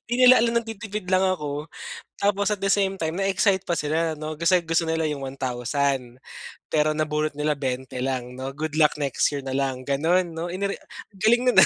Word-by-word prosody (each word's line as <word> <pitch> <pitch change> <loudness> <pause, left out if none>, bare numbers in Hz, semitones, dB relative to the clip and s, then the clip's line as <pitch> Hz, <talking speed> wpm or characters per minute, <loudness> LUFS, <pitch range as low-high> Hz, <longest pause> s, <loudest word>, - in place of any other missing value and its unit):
'di - - +1
nila 255 -2 +8
alam 235 0 +2
nagtitipid 215 -3 -6
lang 185 0 +3
ako, 150 -5 -2 0.5
tapos 200 0 +1
at 210 - 0
the 195 - -2
same 195 -1 +2
time, 160 0 -2
na-excite 195 0 +2
pa 170 -4 -1
sila 155 +1 0
'no, 155 0 -4
gusto 170 -1 +2
nila 160 0 0
'yung 150 -2 -3
1,000 130 -1 -2 0.5
pero 155 0 +2
nabunot 155 0 -1
nila 150 0 -1
20 130 -1 -3
lang, 125 -1 -3
'no? 135 +1 -5
Good 155 +1 -4
luck 150 -2 +4
next 140 -2 +1
year 140 - -2
na 135 -1 -5
lang, 135 -2 -1
gano'n, 165 +7 +1
no? 165 +1 -5 0.7
Galing 235 +5 +4
nun, - - +1
ah. - - +10
155 Hz, 185 wpm, -24 LUFS, 140-190 Hz, 0.7 s, ah